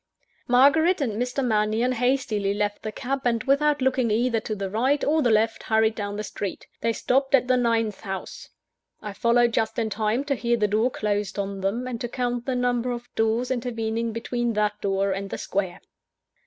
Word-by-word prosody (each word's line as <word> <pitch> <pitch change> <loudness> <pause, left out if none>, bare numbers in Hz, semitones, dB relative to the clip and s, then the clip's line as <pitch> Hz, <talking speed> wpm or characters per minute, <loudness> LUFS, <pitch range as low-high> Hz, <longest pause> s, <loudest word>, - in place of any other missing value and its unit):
Margaret 305 +9 +4
and 255 -7 -1
Mr. 250 +2 -1
Mannion 220 +2 +1
hastily 235 -5 0
left 205 0 -1
the 215 - -4
cab, 270 +5 -3
and 230 -2 +1
without 285 +1 +2
looking 255 -2 +2
either 230 +2 +1
to 215 0 -4
the 195 -1 -3
right 255 +8 +1
or 310 +2 +2
the 245 - +2
left, 225 +1 +2
hurried 220 0 +2
down 205 -2 -4
the 210 - -3
street. 200 -1 -5
They 230 - +1
stopped 270 +4 +2
at 250 -2 +1
the 255 - +4
ninth 230 -4 +1
house. 190 -1 -7 0.5
I 210 - -5
followed 235 +2 +3
just 220 0 0
in 225 -2 -1
time 220 +5 0
to 285 -1 -1
hear 235 -2 0
the 210 -2 +2
door 215 +4 +2
closed 210 -3 -2
on 200 -1 -3
them, 210 +6 -1
and 240 -3 -5
to 240 - -3
count 245 -1 -2
the 260 - 0
number 245 0 0
of 240 0 -7
doors 225 +3 0
intervening 230 -2 -2
between 235 +1 -2
that 210 0 0
door 195 0 0
and 195 +1 -3
the - - -4
Square. 190 -3 -3
230 Hz, 195 wpm, -25 LUFS, 210-250 Hz, 0.5 s, Margaret